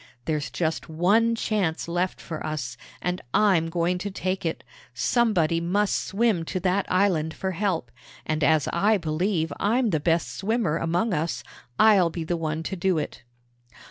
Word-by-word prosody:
There's 155 Hz, -2 st, -1 dB
just 160 Hz, -2 st, -2 dB
one 205 Hz, +9 st, +3 dB
chance 195 Hz, -9 st, -1 dB
left 175 Hz, +2 st, -1 dB
for 160 Hz, -2 st, -6 dB
us, 145 Hz, -6 st, -4 dB, 0.3 s
and 180 Hz, 0 st, -1 dB
I'm 185 Hz, -6 st, +3 dB
going 175 Hz, +1 st, 0 dB
to 200 Hz, +2 st, -3 dB
take 185 Hz, -2 st, -2 dB
it. 160 Hz, -, -4 dB, 0.3 s
Somebody 175 Hz, -9 st, +2 dB
must 195 Hz, +4 st, +1 dB
swim 210 Hz, -4 st, +1 dB
to 185 Hz, -, -3 dB
that 190 Hz, +1 st, 0 dB
island 180 Hz, -4 st, +2 dB
for 190 Hz, -, -2 dB
help, 180 Hz, -, -1 dB, 0.3 s
and 155 Hz, -1 st, -1 dB
as 155 Hz, -2 st, +3 dB
I 205 Hz, +5 st, +3 dB
believe 165 Hz, -1 st, -1 dB
I'm 230 Hz, +2 st, +2 dB
the 160 Hz, -, +1 dB
best 165 Hz, +2 st, 0 dB
swimmer 200 Hz, -5 st, 0 dB
among 175 Hz, +6 st, 0 dB
us, 165 Hz, 0 st, -2 dB, 0.3 s
I'll 200 Hz, -6 st, +6 dB
be 165 Hz, 0 st, -4 dB
the 175 Hz, +2 st, -1 dB
one 160 Hz, -1 st, -2 dB
to 190 Hz, -, -3 dB
do 185 Hz, -1 st, +1 dB
it." 150 Hz, -, -4 dB
175 Hz, 165 wpm, -25 LUFS, 160-200 Hz, 0.3 s, I'll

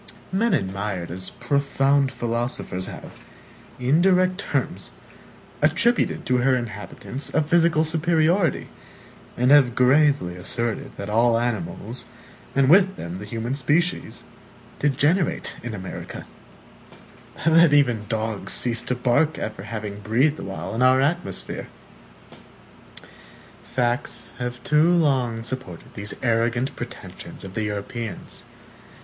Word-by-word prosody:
Men 220 Hz, +5 st, +2 dB
admired 95 Hz, -2 st, -3 dB
as 95 Hz, +1 st, -5 dB
profound 140 Hz, -1 st, +1 dB
philosophers 120 Hz, -6 st, -3 dB
have, -, -, -10 dB, 0.6 s
in 135 Hz, +7 st, +3 dB
direct 185 Hz, 0 st, +3 dB
terms, -, -, -2 dB, 0.7 s
attributed 240 Hz, +1 st, +2 dB
to 125 Hz, -, +2 dB
her 130 Hz, +1 st, +3 dB
inhabitants 120 Hz, +3 st, -5 dB
a 160 Hz, -, +4 dB
physical 165 Hz, 0 st, +3 dB
superiority, 165 Hz, +2 st, +1 dB, 0.7 s
and 125 Hz, +2 st, +3 dB
have 135 Hz, -5 st, +6 dB
gravely 135 Hz, -7 st, +3 dB
asserted 115 Hz, +5 st, -2 dB
that 100 Hz, -, -5 dB
all 115 Hz, +2 st, +3 dB
animals, 115 Hz, 0 st, -3 dB, 0.5 s
and 135 Hz, -1 st, +4 dB
with 190 Hz, +5 st, +5 dB
them 85 Hz, +2 st, -6 dB
the 105 Hz, -, -7 dB
human 115 Hz, +4 st, -3 dB
species, 155 Hz, +6 st, 0 dB, 0.6 s
degenerate 150 Hz, +5 st, +1 dB
in 115 Hz, -2 st, -5 dB
America 95 Hz, -2 st, -7 dB, 1.2 s
that 165 Hz, -1 st, +6 dB
even 120 Hz, -7 st, +3 dB
dogs 110 Hz, -2 st, -1 dB
cease 120 Hz, -1 st, +3 dB
to 125 Hz, -, -2 dB
bark 125 Hz, +5 st, +2 dB
after 110 Hz, -3 st, -5 dB
having 105 Hz, -1 st, -6 dB
breathed 125 Hz, +9 st, +1 dB
awhile 95 Hz, 0 st, -5 dB
in 115 Hz, -, -2 dB
our 130 Hz, +1 st, +5 dB
atmosphere.(1) 135 Hz, -, -7 dB, 0.6 s
Facts 120 Hz, +1 st, -2 dB
have 125 Hz, 0 st, -4 dB
too 150 Hz, +3 st, +4 dB
long 130 Hz, -9 st, +1 dB
supported 115 Hz, -8 st, -7 dB
these 100 Hz, 0 st, -5 dB
arrogant 120 Hz, +2 st, +1 dB
pretensions -, -, -9 dB
of 95 Hz, -1 st, -8 dB
the 110 Hz, +1 st, -2 dB
Europeans. 105 Hz, +1 st, -5 dB
125 Hz, 115 wpm, -23 LUFS, 110-150 Hz, 1.2 s, have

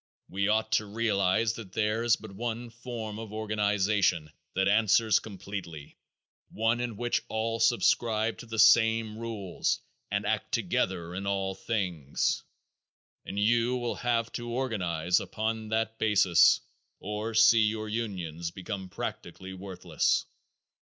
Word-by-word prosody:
We 100 Hz, +1 st, 0 dB
ought 110 Hz, +1 st, +1 dB
to 105 Hz, -, +2 dB
realize 110 Hz, 0 st, +1 dB
that 105 Hz, -5 st, -9 dB
there 110 Hz, +1 st, 0 dB
is 120 Hz, -1 st, +4 dB
but 110 Hz, -1 st, -11 dB
one 115 Hz, +3 st, -4 dB
form 115 Hz, -2 st, -6 dB
of 110 Hz, -2 st, -7 dB
organization 105 Hz, -6 st, +1 dB, 0.2 s
that 95 Hz, +1 st, +2 dB
answers 110 Hz, +1 st, +4 dB
completely, 95 Hz, -7 st, -8 dB, 0.5 s
one 115 Hz, +2 st, +1 dB
in 120 Hz, -3 st, -3 dB
which 120 Hz, +1 st, 0 dB
all 115 Hz, +1 st, -2 dB
subscribe 115 Hz, -1 st, +2 dB
to 120 Hz, -, -9 dB
the 110 Hz, 0 st, -5 dB
same 110 Hz, -1 st, +5 dB
rules 110 Hz, -6 st, -2 dB, 0.3 s
and -, -, -1 dB
act -, -, -1 dB
together 85 Hz, -2 st, -1 dB
in 100 Hz, +2 st, -4 dB
all 95 Hz, -1 st, -1 dB
things, 90 Hz, -, -1 dB, 0.9 s
and 100 Hz, -, -5 dB
you 120 Hz, +4 st, +2 dB
will 120 Hz, -1 st, -2 dB
have 115 Hz, -1 st, 0 dB
to 120 Hz, 0 st, -5 dB
organize 90 Hz, -9 st, 0 dB
upon 110 Hz, 0 st, -3 dB
that 110 Hz, 0 st, -1 dB
basis 100 Hz, -5 st, +5 dB, 0.4 s
or 105 Hz, +3 st, -4 dB
see 115 Hz, 0 st, +7 dB
your 110 Hz, 0 st, -3 dB
unions 90 Hz, -7 st, -3 dB
become 95 Hz, +1 st, -6 dB
practically 95 Hz, +1 st, -6 dB
worthless. 90 Hz, -4 st, -1 dB
110 Hz, 130 wpm, -29 LUFS, 95-115 Hz, 0.9 s, see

